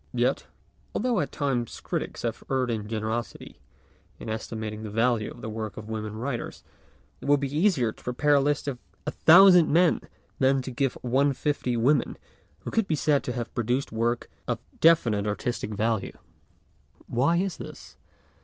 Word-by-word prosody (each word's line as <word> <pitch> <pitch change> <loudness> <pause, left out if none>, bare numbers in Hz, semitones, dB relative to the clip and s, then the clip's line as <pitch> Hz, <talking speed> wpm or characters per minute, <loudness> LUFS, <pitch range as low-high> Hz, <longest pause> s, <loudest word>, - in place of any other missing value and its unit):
Yet, - - +1 0.5
although 240 -2 +1
at 145 - -1
all 145 - +1
times 120 -4 -2
critics - - -4
have - - -3
erred 130 -2 +1
in 105 -2 -3
generosity 110 +1 -4 0.6
in - - -8
esti 110 +1 -4
mating 110 -1 -5
the 110 - -6
value 115 0 +1
of 120 - -11
the - - -5
work 110 -1 -5
of 105 - -8
women 110 -1 -4
writers, 120 +2 -4 0.6
it - - -9
would 145 0 +4
be 140 0 -3
easier 155 - +2
to - - -18
prepare 135 +4 +1
a 140 - +6
list 145 +1 0
of 130 -3 -3 0.3
a 150 - -1
thousand 180 0 +7
men 175 +3 +4 0.4
than 135 0 +3
to 130 - -6
give 135 +1 0
one 130 +3 +3
of 135 - -3
fifty 135 -5 -1
women 130 +4 +2 0.4
who - - -6
could 225 -3 +1
be 160 - +1
said 145 0 +2
to 125 - -2
have 120 -2 -5
produced 120 +4 -1
work 115 +2 -1 0.2
of 120 - 0 0.2
definite 115 -11 +4
artistic 105 +2 -2
value. 110 0 -1 0.9
Why 140 +8 +2
is 190 0 -1
this? - - -10
125 Hz, 180 wpm, -26 LUFS, 115-145 Hz, 0.9 s, thousand